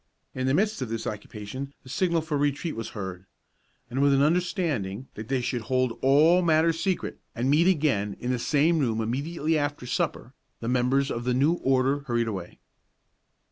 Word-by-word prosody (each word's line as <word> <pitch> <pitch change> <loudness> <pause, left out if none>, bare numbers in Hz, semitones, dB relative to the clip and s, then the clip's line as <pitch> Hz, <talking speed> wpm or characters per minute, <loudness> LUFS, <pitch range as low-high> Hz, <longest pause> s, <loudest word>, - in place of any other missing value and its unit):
In 130 0 -2
the 130 - +3
midst 210 -3 +1
of 125 - -3
this 115 0 -3
occupation 110 +6 -6
the 130 - -13
signal 170 +5 +1
for 155 -1 -3
retreat 145 +3 -1
was 115 0 -5
heard; 95 -1 -6 0.6
and 130 +3 -2
with 140 -1 +5
an 135 - +4
understanding 150 - 0
that 110 +1 -8
they 130 -1 0
should 125 0 -2
hold 130 +1 0
all 155 +7 +5
matters 165 -1 +3
secret, 185 +1 -2 0.2
and 125 +3 +1
meet 160 +4 +4
again 140 - +1
in 125 - -2
the 125 - 0
same 155 +6 +2
room 115 -6 0
immediately 150 +7 -1
after 145 -3 -3
supper, 120 0 -2 0.3
the 115 - -5
members 125 +3 +2
of 120 - -3
the 125 0 0
new 140 +6 +3
Order 135 -3 +1
hurried 120 -2 +1
away. 95 -5 -5
135 Hz, 180 wpm, -26 LUFS, 120-155 Hz, 0.6 s, with